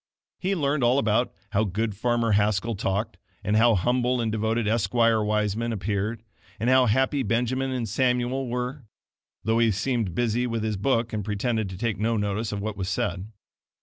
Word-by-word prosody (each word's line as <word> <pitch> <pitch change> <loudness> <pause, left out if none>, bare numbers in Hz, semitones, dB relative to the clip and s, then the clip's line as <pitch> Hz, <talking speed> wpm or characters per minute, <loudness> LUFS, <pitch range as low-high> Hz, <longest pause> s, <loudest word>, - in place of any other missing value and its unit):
He 195 +1 0
learned 145 -4 0
all 120 +2 +4
about 110 -1 +2 0.2
"how 105 +1 +2
good 110 +2 -1
farmer 120 +1 +1
Haskell 105 +2 +2
talked," 100 +1 -2 0.3
and 105 - +1
"how 115 +1 +5
humble 125 +5 +1
and 115 -2 0
devoted 110 +1 0
Esquire 115 +1 +2
Wiseman 105 +2 0
appeared," 105 +1 -2 0.4
and 120 +3 +2
"how 130 -1 +5
happy 130 +5 +2
Benjamin 125 +3 0
and 125 -3 -2
Samuel 125 +3 0
were"; 125 +1 -4 0.6
though 110 +2 +2
he 115 -1 +4
seemed 110 -2 -1
busy 120 +2 +1
with 115 -2 -2
his 110 -1 -1
book 115 +3 0
and 105 -1 -2
pretended 110 +1 -1
to 95 - -7
take 110 -2 -2
no 115 +1 +1
notice 105 +2 -1
of 100 -1 -3
what 105 -1 -4
was 95 -1 -3
said. 90 +1 -2
115 Hz, 180 wpm, -25 LUFS, 105-125 Hz, 0.6 s, how